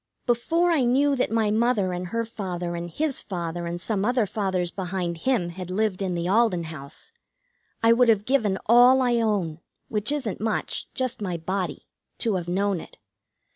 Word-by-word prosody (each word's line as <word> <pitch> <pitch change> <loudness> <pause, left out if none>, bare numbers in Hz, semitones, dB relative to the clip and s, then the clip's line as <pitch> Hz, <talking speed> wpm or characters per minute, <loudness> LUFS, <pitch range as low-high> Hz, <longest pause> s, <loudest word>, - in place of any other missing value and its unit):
Before 325 +9 +2
I 305 -6 +3
knew 275 +4 +3
that 255 - 0
my 220 -1 +1
mother 215 -4 +2
and 180 0 -4
her 230 +5 -2
father 180 -6 -4
and 170 0 -5
his 290 - -1
father 170 -2 -4
and 170 +1 -4
some 200 +1 -1
other 245 0 +2
fathers 185 -3 -1
behind 180 -2 -3
him 190 -3 0
had 180 +1 -7
lived 200 0 0
in 185 -2 -1
the 170 0 -2
Alden 200 -3 +3
House, 155 - -9 0.7
I 230 0 +7
would 240 0 +4
have 210 -2 +3
given 225 -7 +2
all 245 +3 +6
I 240 -1 +2
own, 200 -8 0 0.3
which 210 +4 0
isn't 260 -10 -2
much, 220 0 -2
just 255 -3 -2
my 180 -4 -2
body, 185 +3 -3 0.3
to 225 -3 0
have 175 -3 -2
known 195 +1 0
it. - - -12
205 Hz, 180 wpm, -25 LUFS, 180-235 Hz, 0.7 s, I